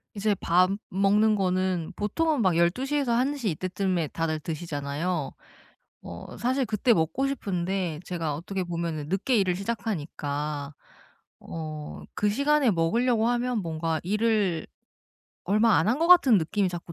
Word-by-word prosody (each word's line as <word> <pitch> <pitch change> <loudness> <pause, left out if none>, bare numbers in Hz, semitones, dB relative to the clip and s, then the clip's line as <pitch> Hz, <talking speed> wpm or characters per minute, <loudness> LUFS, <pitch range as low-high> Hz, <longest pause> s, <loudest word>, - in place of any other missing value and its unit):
이제 205 0 +1
밥 180 0 +3 0.2
먹는 205 +3 +3
거는 185 -3 0
보통은 300 +7 0
막 185 -3 +3
12 170 +10 +2
시에서 280 -3 0
1 255 +5 +2
시 245 -7 -2
이때쯤에 185 -1 -1
다들 160 -1 -2
드시잖아요. 155 0 -3 0.7
어 85 0 -9
사실 260 +2 +1
그때 225 +2 +2
먹고 185 - 0
싶은데 185 - -2
제가 165 -4 -3
어떻게 185 +6 -4
보면은 170 -4 -4
늦게 195 - +1
일을 185 -3 +2
시작하니까 150 -8 -4 0.7
어 155 -2 -7
그 210 - +1
시간에 280 +2 +3
먹으려고 225 +7 +2
하면 245 -1 0
뭔가 165 -1 -2
일을 205 -3 +1 0.8
얼마 215 +3 +4
안 165 - +1
한 245 +5 +2
것 330 - +2
같은 275 - +7
느낌이 190 +4 0
자꾸 175 -1 -7
185 Hz, 285 characters per minute, -26 LUFS, 165-225 Hz, 0.8 s, 같은